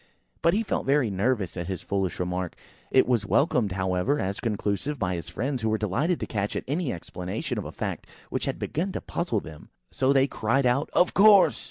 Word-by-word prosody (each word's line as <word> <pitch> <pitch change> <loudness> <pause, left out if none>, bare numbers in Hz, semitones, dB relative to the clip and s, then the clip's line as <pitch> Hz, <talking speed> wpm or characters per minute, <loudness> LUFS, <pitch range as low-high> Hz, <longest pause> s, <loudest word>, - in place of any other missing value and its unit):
But 170 - +3
he 220 - +1
felt 200 - -2
very 135 -5 +3
nervous 100 -1 0
at 85 -2 -4
his 95 -2 -4
foolish 95 -3 -2
remark. 90 0 -2 0.3
It 130 - +5
was 120 -4 +2
welcomed, 115 - +2
however, 95 +8 0
as 100 -6 -2
conclusive 110 +5 -2
by 90 -6 -1
his 85 -3 -5
friends, 130 +3 -2
who 110 - 0
were 110 - +1
delighted 125 - 0
to - - -1
catch 100 -2 -2
at - - -2
any 150 +1 -1
explanation 90 +2 -4
of - - -5
a - - -6
fact - - -5 0.2
which - - -1
had - - -2
begun 185 +5 -2
to - - -3
puzzle 145 - -2
them. 80 -2 -12 0.2
So 130 0 +2
they 135 -1 +5
cried 130 +1 0
out, 125 +5 +2
"Of 180 - +3
course!" 200 -1 +6
115 Hz, 210 wpm, -26 LUFS, 95-140 Hz, 0.3 s, course